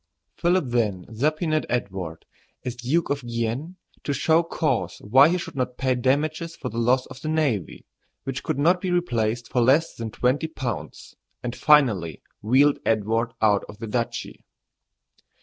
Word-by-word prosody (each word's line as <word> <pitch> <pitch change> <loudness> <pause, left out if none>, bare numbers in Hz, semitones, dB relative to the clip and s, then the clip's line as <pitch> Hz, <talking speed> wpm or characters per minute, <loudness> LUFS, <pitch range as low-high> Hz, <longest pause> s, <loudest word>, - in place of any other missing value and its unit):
Philip 175 -1 +2
then 105 -7 0
subpoenaed 155 +5 0
Edward, 95 -8 -3 0.4
as 125 -1 -3
Duke 135 +8 0
of 140 0 -1
Guienne, 120 +8 -3 0.3
to 145 - -1
show 160 +4 +3
cause 170 - -1
why 130 +8 +6
he 180 - +1
should 170 - -7
not 125 -2 -2
pay 130 -1 +1
damages 155 +6 0
for - - -5
the 115 - -4
loss 125 +2 +2
of 130 - -12
the - - -5
navy, 145 - -1 0.4
which 135 -1 -4
could 155 - -2
not 175 +5 +3
be 185 - -2
replaced 120 -10 0
for 125 - +2
less 140 +7 +3
than 115 -1 -5
twenty 130 +8 0
pounds, 130 -7 -6 0.3
and 120 0 -3
finally 115 - +3 0.2
wheedled 135 +7 +4
Edward 115 +2 0
out 105 -2 +4
of 105 - -10
the 115 - -6
duchy. 115 +2 -3
130 Hz, 160 wpm, -24 LUFS, 115-155 Hz, 0.4 s, why